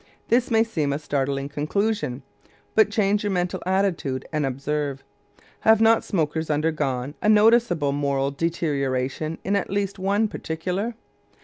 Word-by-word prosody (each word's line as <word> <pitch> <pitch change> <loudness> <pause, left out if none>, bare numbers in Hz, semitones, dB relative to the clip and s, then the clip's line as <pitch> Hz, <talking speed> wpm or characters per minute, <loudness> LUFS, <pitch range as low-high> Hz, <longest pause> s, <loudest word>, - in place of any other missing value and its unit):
This 240 +1 +3
may 225 -2 +4
seem 155 -11 -1
a 140 - 0
startling 140 -2 -2
conclusion, 150 - -2 0.5
but 215 -1 +5
change 205 -1 +1
your 205 - 0
mental 180 -2 -1
attitude 185 -9 0
and 150 -2 0
observe. 140 +1 -3 0.6
Have 220 -1 +5
not 225 0 +4
smokers 160 -3 -1
undergone 145 -4 -1
a 210 - +2
noticeable 215 -8 +4
moral 140 -1 0
deterioration 145 -2 -2
in 200 +2 0
at 200 - -1
least 200 0 -2
one 200 +3 +1
particular? 185 +6 -3
160 Hz, 135 wpm, -24 LUFS, 140-205 Hz, 0.6 s, but